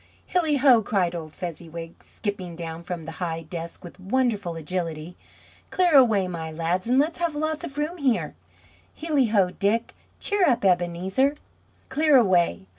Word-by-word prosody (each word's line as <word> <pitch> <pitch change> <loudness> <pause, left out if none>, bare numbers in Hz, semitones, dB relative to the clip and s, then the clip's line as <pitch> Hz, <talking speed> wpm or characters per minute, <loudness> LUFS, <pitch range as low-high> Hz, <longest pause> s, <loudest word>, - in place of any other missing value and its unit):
"Hilli 320 -5 +1
ho!" 255 -4 +6
cried 190 -4 0
old 160 -3 -7
Fezziwig, 165 -1 -7
skipping 190 -5 -5
down 165 -1 -6
from 175 -1 -6
the 160 - -7
high 165 -2 -2
desk 170 +1 -8
with 175 +1 -11
wonderful 205 -3 0
agility. 165 0 -4 0.5
"Clear 360 -3 +2
away, 220 -8 +5
my 165 -3 -5
lads, 170 +5 -1
and 250 +2 +3
let's 310 +5 +1
have 340 -3 -1
lots 310 +1 -2
of 275 - -7
room 305 +4 -2
here! 265 -7 0 0.7
Hilli 300 -6 +2
ho, 195 -4 +3
Dick! 215 +5 0 0.3
Cheer 405 -5 +2
up, 235 -5 +1
Ebenezer!" 185 +9 +1 0.6
Clear 300 +1 +4
away! 175 - +2
190 Hz, 155 wpm, -25 LUFS, 170-270 Hz, 0.7 s, ho